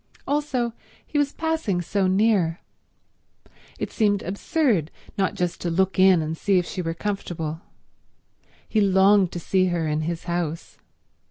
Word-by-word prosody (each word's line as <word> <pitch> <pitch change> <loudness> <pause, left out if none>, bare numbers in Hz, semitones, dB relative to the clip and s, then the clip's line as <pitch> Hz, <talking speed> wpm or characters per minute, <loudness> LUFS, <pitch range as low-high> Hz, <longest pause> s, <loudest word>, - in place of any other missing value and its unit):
Also, 275 -5 0 0.3
he 295 - -1
was 285 -1 +1
passing 320 - -1
so 190 +2 0
near. 190 -4 +2 1.2
It - - -4
seemed 205 -3 +1
absurd 200 - 0 0.3
not 195 -2 0
just 175 -1 -2
to 175 - -1
look 190 +3 +1
in 185 -3 +6
and 155 +1 -3
see 195 +3 +1
if 180 - +1
she 180 - -4
were 165 -1 -3
comfortable. 165 -5 -4 1.1
He 215 - +1
longed 195 -1 +4
to 175 - -3
see 185 +2 +1
her 170 -3 -1
in 150 0 0
his 165 +1 -3
house. 170 -2 -4
185 Hz, 150 wpm, -24 LUFS, 170-210 Hz, 1.2 s, in